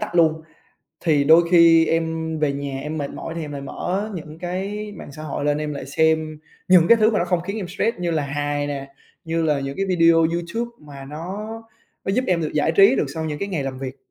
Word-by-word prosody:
tắt 215 -5 -5
luôn. 160 -2 +3 0.6
Thì 150 -4 +3
đôi 160 +3 +7
khi 165 -2 +6
em 160 -1 -1
về 150 -2 +1
nhà 140 -1 -4
em 150 +3 -4
mệt 140 -1 -3
mỏi 165 - -7
thì 170 - -4
em 145 - -7
lại 140 - -5
mở 190 +9 -3
những 155 -1 -8
cái 200 +4 -4
mạng 145 - -10
xã 155 +2 -9
hội 145 -1 -4
lên, 145 0 +1
em 150 0 -3
lại 135 - -6
xem 155 +1 +1 0.3
những 180 -2 +6
cái 235 - +8
thứ 220 0 +4
mà 210 - +1
nó - - +1
không 180 -1 0
khiến 195 +5 -5
em 190 -5 -4
stress 225 +5 -1
như 175 -1 -1
là 155 -2 0
hài 145 +1 -2
nè, 140 -1 -6 0.3
như 165 0 -1
là 150 -3 +1
những 135 0 -5
cái 195 - -1
video 170 -3 +4
YouTube 170 +8 0
mà 140 -2 -11
nó 170 +9 -6 0.6
nó - - -1
giúp 255 +5 +1
em 180 -2 +1
được 155 - -2
giải 150 +2 +2
trí 200 +9 +6
được - - +1
sau 160 0 -3
những 150 -1 -3
cái 200 - -3
ngày 170 -7 -2
làm 130 -1 -4
việc. 130 -1 -6
160 Hz, 245 wpm, -22 LUFS, 145-180 Hz, 0.6 s, cái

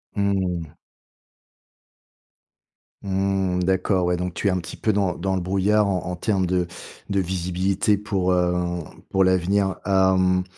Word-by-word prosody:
Mmh. 95 -5 -1 2.3
Mmh, 95 -1 0
d'accord, 95 0 +1
ouais, 90 0 +1 0.2
tu - - -1
es - - +5
un 90 - 0
petit 85 - -8
peu 110 - 0
dans 100 -3 0
dans 95 +2 -1
le 95 - -1
brouillard, 100 +3 +2
en 95 -2 0
en 90 0 -3
terme 95 -1 0
de 90 -1 0 0.4
de 100 -1 +1
visibilité 95 +3 0
pour, 95 -3 0
heu, 90 -1 0 0.3
pour 95 - +3
l'avenir, 95 +1 +2
hem, 95 -1 +3
95 Hz, 135 wpm, -23 LUFS, 90-100 Hz, 2.3 s, es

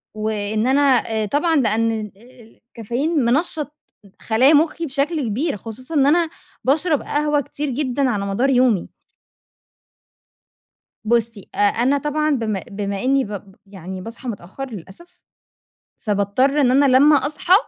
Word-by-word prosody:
وإن 215 +1 -1
أنا 270 -2 +3 0.2
طبعًا 300 - +1
لأن 230 -4 +2
ال 210 -1 -7
ال 235 0 -19
الكافيين 255 +9 -2
منشط 295 +3 0 0.5
خلايا 250 +7 +3
مخي 320 +2 +2
بشكل 295 +3 -1
كبير، 265 +4 -1
خصوصًا 235 - -9
إن 275 -2 +4
أنا 330 +3 +3 0.3
باشرب 300 +2 +1
قهوة 295 0 0
كتير 290 +2 -5
جدًا 265 0 -1
على 205 -4 -1
مدار 200 +7 0
يومي. 250 -7 +2 2.2
بُصي، 230 -2 -1
أ - - -10
أنا 240 +7 +2
طبعًا 300 +2 -1
بما 220 -8 -1
بما 200 -1 -4
إني 270 +1 +2
ب 200 -2 -8
يعني 190 -1 -8
باصحى 230 +5 -9
متأخر 225 +6 -7
للأسف، 230 - -12 0.8
فباضطر 215 +7 +1
إن 250 -3 +3
أنا 275 +2 +4
لما 295 +3 +6
أصحى 300 +5 +1
255 Hz, 130 wpm, -20 LUFS, 215-290 Hz, 2.2 s, لما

